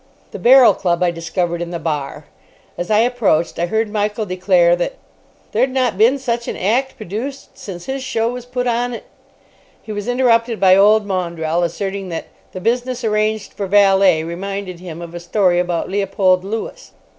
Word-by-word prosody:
The - - -7
Barrel 250 +5 +7
Club 175 -1 0
I 175 - +2
discovered 170 +1 -3
in 175 - -4
the 175 - -4
bar. 150 -4 -4 0.5
As 175 - -5
I 215 0 +4
approached, 225 -11 +1
I 175 - 0
heard 220 +3 0
Michael 210 +1 -2
declare 180 -2 +3
that 175 +9 -2 0.6
"there'd 265 - +2
not 255 -5 0
been 230 +7 +4
such 240 -3 -3
an - - -4
act 255 +8 0
produced 235 +6 -6
since 175 -3 -9
his 265 0 -4
show 225 -3 -1
was 245 0 -5
put 250 0 -3
on 240 0 -1
at——" - - -9 0.8
He 220 - -10
was 205 0 -5
interrupted 240 -2 +2
by 185 -1 +6
old 210 +2 +5
Maundrell 170 -3 -2
asserting 195 +3 -3
that 165 - -5 0.3
"the 185 - -7
business 245 +4 -1
arranged 215 -1 -1
for 200 - -4
valet 195 -4 +4
reminded 185 +2 -5
him 175 -2 -8
of 170 0 -9
a 175 - -6
story 175 0 +1
about 175 -2 -1
Leopold 195 -2 +1
Lewis." 225 - -6
200 Hz, 180 wpm, -18 LUFS, 175-230 Hz, 0.8 s, Barrel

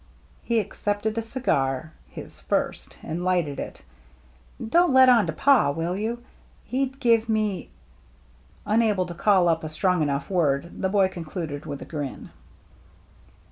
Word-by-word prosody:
He 230 -1 +1
accepted 205 +1 -2
a 230 - 0
cigar, 155 - -1 0.2
his - - -8
first, - - -2
and 170 +3 -4
lighted 175 -6 0
it. - - -7 0.4
" 60 - -12
Don't 350 -2 +5
let 260 0 +8
on 230 -7 +5
to - - -1
Pa, 270 - +4
will 165 +5 -2
you? 230 +4 -3 0.4
He'd 265 +1 -2
give 230 -3 +3
me 215 -3 -1 0.3
— - - -31
" 65 +2 -30
Unable 215 -5 +2
to 175 - -7
call 185 0 +3
up 165 -1 +1
a 155 - -4
strong 180 +2 +1
enough 140 -1 -1
word, 165 -3 0
the 190 - +1
boy 195 -1 +3
concluded 165 -4 -6
with 140 -1 -5
a - - -10
grin. 145 -4 -6
180 Hz, 160 wpm, -25 LUFS, 145-220 Hz, 0.4 s, let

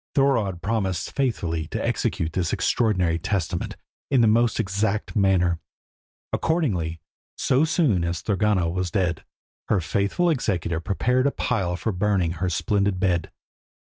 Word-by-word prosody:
Thorodd 115 -11 +2
promised 100 -4 -1
faithfully 85 - -1
to - - -3
execute 80 -1 -1
this 90 -3 0
extraordinary 90 -8 +1
testament 95 -2 -2 0.3
in 135 -3 +4
the 115 - +5
most 115 +1 +3
exact 100 +1 -1
manner. 90 -4 +2 0.7
Accordingly, 95 - 0 0.4
so 135 +5 +3
soon 150 - +2
as 85 -1 -2
Thorgunna 105 -4 +1
was 90 +1 -1
dead, 85 -3 -1 0.4
her 105 - +2
faithful 100 - +1
executor 90 - -1
prepared 125 +9 +1
a - - +1
pile 95 -11 -1
for 110 +5 -2
burning 95 -3 +1
her 90 +2 -2
splendid 100 +2 0
bed. 90 -3 +1
95 Hz, 135 wpm, -24 LUFS, 85-115 Hz, 0.7 s, the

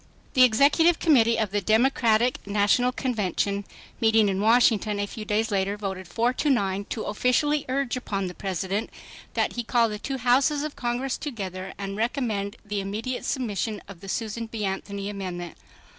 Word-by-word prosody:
The 255 - +4
Executive 285 +8 +5
Committee 230 -8 +4
of 215 -4 0
the 205 0 0
Democratic 230 +1 +2
National 205 +5 +3
Committee, 205 -5 -1 0.4
meeting 220 -2 +4
in 195 0 -1
Washington 220 -2 +3
a 205 - 0
few 215 +1 -8
days 215 +1 0
later, 200 +1 0
voted 190 -3 -5
4 230 +8 +1
to 295 - 0
9. 200 -6 +1
to 220 - -4
"officially 280 +7 +1
urge 270 -1 0
upon 200 -6 -3
the 180 - -5
President 195 +3 -3 0.5
that - - +1
he 240 - -3
call 235 0 +2
the 210 0 -5
two 270 +4 -3
Houses 265 +4 +2
of 305 -1 -5
Congress 245 +2 -2
together 190 -9 -5
and 195 0 -5
recommend 220 -4 -1
the 205 -1 -2
immediate 220 +6 -4
submission 220 -4 -2
of 195 -3 -11
the 195 - -10
Susan 225 +2 -3
B. 220 -2 -4
Anthony 200 +1 -4
amendment." 180 -4 -5
220 Hz, 170 wpm, -25 LUFS, 200-250 Hz, 0.5 s, Executive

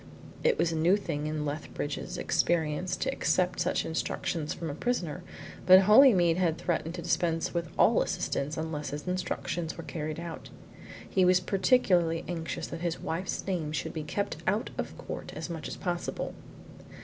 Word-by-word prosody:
It 485 -1 +3
was 165 - +2
a - - -2
new 170 +5 +4
thing 150 -7 -3
in 155 -1 -2
Lethbridge's 145 0 -4
experience 165 +1 +1
to - - -1
accept 180 +3 +1
such - - +1
instructions 160 -1 -2
from 165 -3 -4
a - - -5
prisoner, 180 -4 -2 0.5
but 185 +1 +10
Holymead 195 -6 +6
had 170 -3 +1
threatened 170 -1 -2
to 175 - -6
dispense 170 -1 0
with 170 -2 -2
all - - +5
assistance 145 +3 -2
unless 155 -3 -3
his 145 +5 -6
instructions 175 -2 -2
were 170 - -6
carried 155 -1 -4
out. 170 -1 -7 0.6
He 190 - +2
was 180 0 +5
particularly 180 -4 +2
anxious 165 -2 -3
that 165 - -7
his 170 -1 -1
wife's 175 +4 -3
name 170 -6 -2
should - - -3
be 160 - -3
kept 180 +4 -2
out 205 +4 +1
of - - -5
court - - -7
as - - -5
much 160 -2 -5
as - - -6
possible. 175 -1 -3
170 Hz, 170 wpm, -29 LUFS, 160-185 Hz, 0.6 s, but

